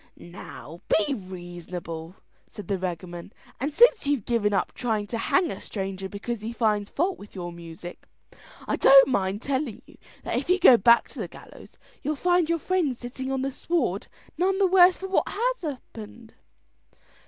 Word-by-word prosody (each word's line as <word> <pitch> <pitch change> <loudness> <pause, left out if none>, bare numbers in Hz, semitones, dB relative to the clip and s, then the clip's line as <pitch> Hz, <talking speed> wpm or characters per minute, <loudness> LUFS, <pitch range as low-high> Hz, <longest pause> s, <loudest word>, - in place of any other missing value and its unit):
"Now 170 -3 -11 0.3
you're 280 - -1
reasonable," 175 -3 -8 0.3
said 205 -4 -10
the 195 -2 -1
beggarman; 175 +1 -6 0.3
"and 280 +5 -2
since 475 - +5
you've 280 -8 0
given 230 -4 +1
up 195 -2 0
trying 220 -4 -1
to 230 +3 -4
hang 360 +8 +1
a 195 - -7
stranger 195 -1 -5
because 210 +3 -5
he 220 +2 -4
finds 210 -3 0
fault 360 +5 -1
with 205 - -13
your 175 -2 -5
music, 170 +1 -10 0.6
I - - 0
don't 270 0 +8
mind 200 -2 -1
telling 270 -4 -2
you - - -19 0.2
that - - -2
if - - -8
you 365 - +5
go 295 -9 +8
back 235 +2 +5
to - - -11
the - - -3
gallows - - -15 0.2
you'll 300 - -1
find 350 +2 +2
your 335 - +2
friends 330 -6 0
sitting 260 +2 -6
on 265 -1 -1
the 275 - -1
sward 335 +5 -1 0.3
none 380 +2 +2
the 395 - +4
worse 365 -1 +6
for 385 - -6
what 380 - +1
has - - -1
happened." 235 - -8
230 Hz, 175 wpm, -26 LUFS, 190-305 Hz, 0.6 s, don't